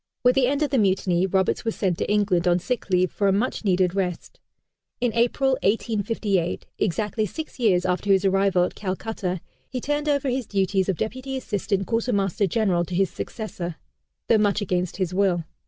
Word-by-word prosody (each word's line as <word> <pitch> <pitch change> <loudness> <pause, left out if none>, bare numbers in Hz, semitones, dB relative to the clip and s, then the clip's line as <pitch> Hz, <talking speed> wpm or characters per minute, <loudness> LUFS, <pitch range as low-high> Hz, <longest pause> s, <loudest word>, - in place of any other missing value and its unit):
With 250 0 +5
the 265 -2 +3
end 285 +3 +1
of 290 - -1
the 270 - +3
Mutiny, 190 -2 +2
Roberts 190 0 +1
was 225 -1 -2
sent 185 -4 -1
to - - -1
England 195 -4 +2
on 175 0 +4
sick 225 +4 -3
leave 185 -1 +2
for 200 - 0
a - - +4
much 215 +6 -1
needed 185 -3 +2
rest. 185 -3 -3 0.6
In 245 -2 0
April, 245 +3 +2
1858, 205 -3 0
exactly 210 +3 0
six 315 - -7
years 185 -6 +3
after 185 +2 0
his 195 0 +4
arrival 195 -1 +3
at 180 - -2
Calcutta, 190 -2 -3 0.3
he 255 - -3
turned 295 +3 -1
over 280 -1 +1
his 250 -3 -2
duties 195 -1 +1
of 185 - 0
Deputy 260 +4 -3
Assistant 200 -5 -2
Quartermaster 205 -4 0
General 190 -3 +1
to 175 - -5
his 190 0 +2
successor 180 -6 -5 0.5
though 225 - +4
much 205 -1 +2
against 180 -3 -1
his 185 -2 -1
will. 185 -3 +2
200 Hz, 185 wpm, -24 LUFS, 185-230 Hz, 0.6 s, With